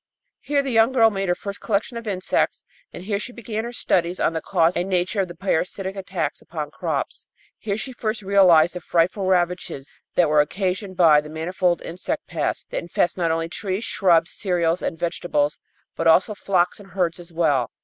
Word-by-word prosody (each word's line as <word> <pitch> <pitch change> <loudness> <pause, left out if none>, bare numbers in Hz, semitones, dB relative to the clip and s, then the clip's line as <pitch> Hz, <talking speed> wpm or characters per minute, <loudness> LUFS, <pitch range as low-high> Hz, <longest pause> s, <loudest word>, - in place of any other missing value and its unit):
Here 285 -1 0
the 270 - -3
young 225 +2 +4
girl 225 -3 +5
made 195 -2 -2
her 175 - +3
first 200 +1 -7
collection 220 +3 -1
of 230 -1 -6
insects, 185 -2 0 0.3
and - - -9
here 200 0 -1
she 245 - -5
began 225 -2 -5
her 240 - -5
studies 180 -6 0
on - - +1
the 160 - -2
cause 165 +3 +2
and 180 +2 -1
nature 185 +3 +1
of 190 - -2
the 175 - -10
parasitic 190 +1 -2
attacks 195 -1 -3
upon - - -6
crops. - - -3 0.3
Here 200 -2 -2
she 260 +4 -5
first 215 -3 -3
realized 180 -4 +5
the 180 - -6
frightful 180 +4 +1
ravages 180 -6 0 0.3
that 175 - +4
were 150 0 +5
occasioned 185 +4 -2
by 155 -4 +6
the 150 - -11
manifold 175 +3 -1
insect 240 - -4
pests - - -2
that - - -1
infest 175 +1 0
not 170 -3 0
only 165 0 0
trees, 190 +4 -3
shrubs, 170 -6 +2
cereals 175 -3 0
and 165 - -3
vegetables, 155 -3 -1 0.4
but 165 - 0
also 180 +6 +5
flocks 185 -3 0
and 195 -3 -15
herds 180 -3 0
as 175 0 -12
well. 150 -8 +1
180 Hz, 195 wpm, -23 LUFS, 170-200 Hz, 0.4 s, by